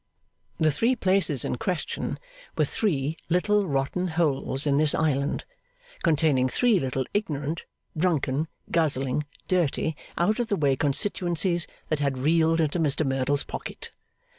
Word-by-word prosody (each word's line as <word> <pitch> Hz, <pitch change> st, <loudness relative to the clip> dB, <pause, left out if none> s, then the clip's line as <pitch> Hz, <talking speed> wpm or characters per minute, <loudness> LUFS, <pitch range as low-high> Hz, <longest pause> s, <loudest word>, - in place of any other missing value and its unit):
The 155 Hz, -1 st, +3 dB
three 230 Hz, -, +2 dB
places 185 Hz, -, +2 dB
in -, -, -2 dB
question 185 Hz, -7 st, -3 dB, 0.4 s
were -, -, +3 dB
three 155 Hz, -7 st, -1 dB
little 200 Hz, +3 st, +2 dB
rotten 140 Hz, +6 st, -1 dB
holes 150 Hz, -4 st, 0 dB
in 140 Hz, -1 st, +2 dB
this 155 Hz, -1 st, +4 dB
Island, 145 Hz, -2 st, 0 dB, 0.6 s
containing 150 Hz, -6 st, +2 dB
three 235 Hz, -, +3 dB
little 130 Hz, -2 st, -2 dB
ignorant, 155 Hz, -5 st, -2 dB, 0.3 s
drunken, 155 Hz, -3 st, 0 dB, 0.2 s
guzzling, 145 Hz, -3 st, +1 dB, 0.2 s
dirty, 160 Hz, -3 st, 0 dB, 0.2 s
out 210 Hz, +7 st, +2 dB
of 240 Hz, -, 0 dB
the 205 Hz, -, +1 dB
way 140 Hz, -3 st, +2 dB
constituencies, 170 Hz, +3 st, +1 dB, 0.2 s
that 155 Hz, -, 0 dB
had 140 Hz, -2 st, 0 dB
reeled 160 Hz, +4 st, +2 dB
into 160 Hz, +2 st, +1 dB
Mr 150 Hz, -1 st, +1 dB
Merdle's 135 Hz, +1 st, 0 dB
pocket. -, -, -7 dB
155 Hz, 135 wpm, -26 LUFS, 140-180 Hz, 0.6 s, this